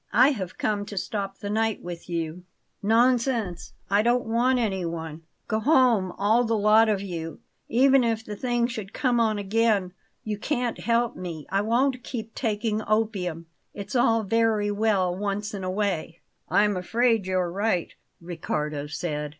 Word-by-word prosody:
"I 255 +3 +6
have 190 -9 -5
come 210 -1 -1
to 205 - -8
stop 195 0 -3
the 200 - -6
night 220 0 0
with 175 0 -8
you." 165 0 -3 0.4
"Nonsense! 230 -3 +1
I 200 +1 +3
don't 240 +2 +2
want 240 +3 +2
anyone. 170 -8 -3 0.3
Go 220 - 0
home, 235 - +3
all 220 +4 +2
the 225 -1 0
lot 215 +2 +5
of 205 -2 +1
you. 165 -4 -6 0.3
Even 265 +2 +5
if 225 -1 -1
the 210 - -6
thing 240 +1 0
should 215 -5 -5
come 245 -3 +1
on 220 -2 +2
again, 205 -2 +1 0.3
you 210 -2 -4
can't 245 -2 -2
help 235 0 +1
me; 170 -4 -6
I 195 +1 +2
won't 250 +3 +1
keep 225 -3 -6
taking 215 -2 -1
opium. 195 -7 -1 0.3
It's 200 +6 -6
all 230 -2 +3
very 215 0 +1
well 200 -4 +1
once 205 +2 -3
in 195 -2 -5
a 185 - -2
way." 185 -4 -2 0.3
"I'm 210 0 +3
afraid 225 +2 +1
you're 185 -2 0
right," 195 -2 -1 0.3
Riccardo 150 -4 -4
said. 150 -1 -3
210 Hz, 160 wpm, -25 LUFS, 185-230 Hz, 0.4 s, I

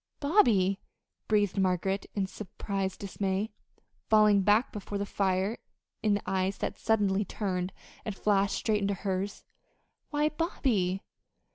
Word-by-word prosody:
"Bobby!" 225 - +4 0.5
breathed 205 -2 +2
Margaret 190 +1 0
in 200 -2 +1
surprised 195 -1 -4
dismay, 195 +1 -2 0.6
falling 210 -2 +6
back 210 +5 +3
before 205 -1 -5
the 200 - -1
fire 195 +2 0 0.4
in 210 -2 +3
the 205 - -3
eyes 190 +1 0
that - - -3
suddenly 205 -3 +2
turned 185 -2 -2 0.3
and 215 -4 -4
flashed 200 -1 +2
straight 215 -2 0
into 200 0 0
hers. 190 +1 -3 0.7
"Why, 300 0 +2
Bobby!" 235 - 0
200 Hz, 125 wpm, -29 LUFS, 190-215 Hz, 0.7 s, falling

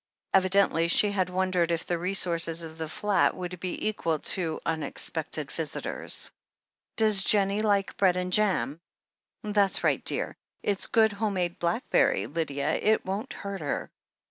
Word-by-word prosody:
Evidently 185 -3 +3
she 205 +4 +4
had 185 -3 0
won 185 +1 -1
dered 175 -2 +1
if 165 -1 -1
the 175 -1 -2
resources 170 -2 +2
of 160 0 -10
the 160 -1 -4
flat 205 +4 +1
would 180 -1 -6
be 180 +3 -4
equal 170 -7 -1
to 165 0 0
unex 160 -3 0
pected - - -3
visitors. - - -1 0.7
"Does 215 -4 +5
Jennie 200 0 +4
like 200 -2 0
bread 185 -2 +3
and 180 0 -3
jam? 185 -7 +1 0.6
That's 205 -2 +1
right, - - +1
dear - - 0 0.2
— - - -46
it's 200 -2 +1
good, 220 -2 +3
home 205 0 -2
made 175 -2 -2
blackberry, 175 +8 +1
Lydia, 145 -3 -2
it 220 +1 +2
won't 200 +7 -4
hurt 200 -2 -6
her. 145 - -4
185 Hz, 160 wpm, -27 LUFS, 170-200 Hz, 0.7 s, Does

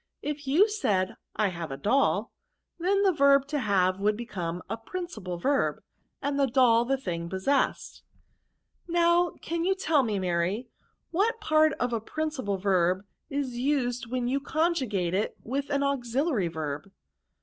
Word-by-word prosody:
If 295 -1 -4
you 315 +10 +5
ssad 205 - 0 0.2
I 210 -2 +2
have 170 -3 -5
a 135 - -5
doll', 270 - +1 0.5
then 395 +3 +2
the 390 - +5
verb 280 -3 +4
to 295 - 0
have 190 -5 +2
Would 210 +1 +1
become 180 -7 -4
a - - -2
principal 225 - -6
verb, 275 +10 0 0.4
and 285 0 0
doU 245 -3 +4
the 270 +1 +2
thing 170 -9 -4
possessed." 190 +10 0 0.5
" - - -48
Now, 345 0 +3
can 335 +1 -2
you 380 +2 +2
tell 325 -6 +2
me. 220 -5 -1
Maty, 185 +6 -1 0.4
what 440 +7 +1
part 310 -6 +3
of 245 -2 -2
a 230 - -1
principal 265 -6 -2
verb 185 0 +1 0.2
is 275 -4 -3
used 250 -3 0
when 250 -1 -1
you 270 +3 +1
<;on« 315 +4 +1
jugate 205 - -1
it 200 +3 0
with 275 +4 -3
an 280 -1 +1
auxiUary 260 - 0
verb 155 +2 -4
255 Hz, 160 wpm, -28 LUFS, 195-300 Hz, 0.5 s, you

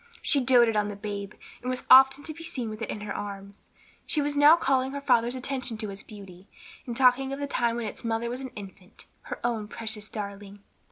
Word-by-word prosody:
She 285 - +3
doated 240 -3 +4
on 210 0 +1
the 205 - -5
babe, 200 -1 -6 0.3
and 250 - -4
was 255 0 -3
often 265 +2 +7
to 310 - -5
be 330 - -10
seen 245 -8 -4
with 215 +1 -9
it - - -4
in 210 - -5
her 210 - -5
arms. 200 0 -8 0.4
She 310 - 0
was 290 0 0
now 290 +3 +8
calling 265 -4 0
her 280 - -3
father's 240 -2 +2
attention 255 -2 -3
to 215 -2 -4
its 195 - -10
beauty, 195 -3 -13 0.4
and 235 -1 -4
talking 265 +1 +4
of 275 - -4
the 285 - -2
time 235 -4 0
when 235 -1 -3
its 210 - -7
mother 230 0 -1
was 245 +2 -5
an 260 - -6
infant, 195 -1 -11 0.2
her - - -6
own 230 -3 -1
precious 220 -1 -3
darling. 200 -1 -7
230 Hz, 225 wpm, -27 LUFS, 205-265 Hz, 0.4 s, now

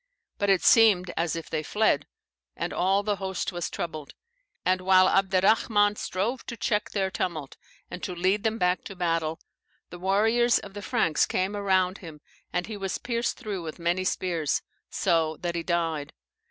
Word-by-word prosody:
But 200 - +1
it 195 -2 +3
seemed 200 -6 +5
as 165 -1 0
if 165 - -6
they 155 - -2
fled; 155 -4 +1 0.5
and - - -3
all 195 +2 +2
the 205 -1 -1
host 190 -1 -3
was 175 -2 -3
troubled. 155 -4 -6 0.5
And 185 0 +2
while 185 0 +5
Abderrahman 205 +2 +3
strove 210 +7 -2
to 235 - -6
check 210 -2 0
their 195 -2 -1
tumult, 160 -7 -3 0.4
and 180 - -6
to 180 - -4
lead 185 +4 +1
them 220 0 0
back 180 -2 +1
to 195 - -8
battle, 165 -2 -1 0.5
the 175 - -9
warriors 220 +6 +3
of 200 - -8
the 205 - -7
Franks 200 -9 +1
came 190 +3 -1
around 190 -2 +1
him, 160 -4 -10 0.3
and 180 - -1
he 215 -2 -6
was 195 -1 -3
pierced 235 -1 -2
through 210 -7 -5
with 160 -2 -7
many 175 +2 0
spears, 170 -5 -1 0.3
so 160 -2 +1
that 175 -1 -2
he 170 - -2
died. 165 -4 -2
185 Hz, 175 wpm, -27 LUFS, 170-205 Hz, 0.5 s, seemed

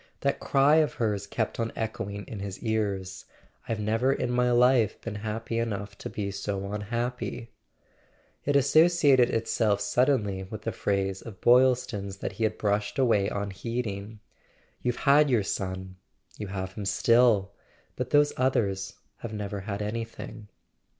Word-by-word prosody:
That - - 0
cry 140 +3 +4
of 155 -2 +2
hers 105 -4 -1
kept 110 +2 -2
on 115 0 -1
echoing 105 -2 -4
in 110 - -7
his 100 -1 -5
ears: 100 -4 -2 0.4
"I've 115 -1 -1
never 115 +5 +1
in 125 -2 -1
my 125 0 +2
life 120 -3 +4
been 115 - -6
happy 110 +2 -3
enough 100 -3 -3
to - - -6
be 100 -1 -3
so 100 0 -4
unhappy!" 115 +2 -3 0.9
It 145 - 0
associated 140 -3 +5
itself 110 -2 +1
suddenly 105 -3 +1
with 105 +3 -8
a 115 - 0
phrase 95 -2 -1
of 105 -5 -10
Boylston's 120 -6 +3
that - - -4
he 110 +3 -1
had 110 - -1
brushed 105 +4 -1
away 115 -7 +3
unheeding: 105 +1 -4 0.6
"You've 125 -1 0
had 145 +1 +6
your 120 -5 +3
son— 95 -1 -4 0.4
you 105 - -6
have 95 -1 -5
him 105 -1 -6
still; 105 0 +3 0.4
but 125 0 -3
those 145 0 +4
others 100 -7 0 0.2
have 115 -2 -7
never 105 -1 -4
had 100 +1 -4
anything." 115 0 -6
110 Hz, 150 wpm, -27 LUFS, 100-125 Hz, 0.9 s, had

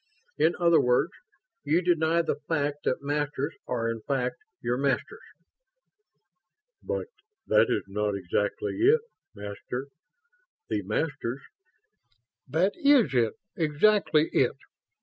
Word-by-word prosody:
In 170 - +3
other 170 -2 +5
words, 125 0 +2 0.5
you 160 +5 +2
deny 170 -1 +2
the 145 - -2
fact 145 -2 -1
that 130 - 0
Masters 145 +1 -1
are 115 -2 -1
in 115 -1 -3
fact 130 -3 -1 0.2
your 120 - -1
Masters." 140 - -1 1.6
"But - - -3 0.4
that - - +4
is - - 0
not 105 +1 -1
exactly 100 - -2
it, 440 +6 +5 0.3
Master. 105 +6 -6 0.8
The - - 0
Masters 135 -4 -2 0.6
..." 115 -1 -46
"That 165 +9 +1
is 280 - +4
it. 115 -3 +2 0.2
Exactly 160 0 +3
it. - - +2
145 Hz, 115 wpm, -27 LUFS, 120-165 Hz, 1.6 s, other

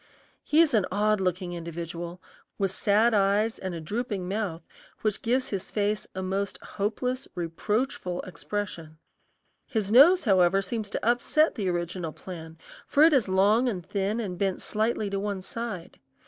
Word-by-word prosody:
He 310 +2 +4
is 325 -5 +3
an 210 -5 +3
odd 210 +1 +2
looking 180 -1 -1
individual, 170 +1 -6 0.4
with 195 -2 0
sad 215 +4 +3
eyes 205 +2 +2
and 185 -2 -4
a - - -4
drooping 205 +2 -3
mouth 190 -5 -3 0.4
which 215 -2 -1
gives 255 +3 0
his 195 -2 -4
face 210 0 -1
a 190 - -3
most 195 +1 -2
hopeless, 250 +5 -2
reproachful 180 +2 -2
expression. 180 -4 -5 0.7
His 210 -3 -1
nose, 325 +10 +7
however, 195 -2 +4
seems 215 +1 -4
to - - -4
upset 245 +6 +3
the 200 -5 -2
original 175 -2 -3
plan, 165 -3 -9 0.3
for 290 - +4
it 320 0 +7
is 260 -7 +3
long 205 +6 +3
and 180 -7 -4
thin 200 +4 -1
and 185 -6 -4
bent 195 -2 -1
slightly 215 0 0
to 195 - -1
one 200 -2 -3
side. 215 -6 -6
200 Hz, 160 wpm, -27 LUFS, 180-220 Hz, 0.7 s, nose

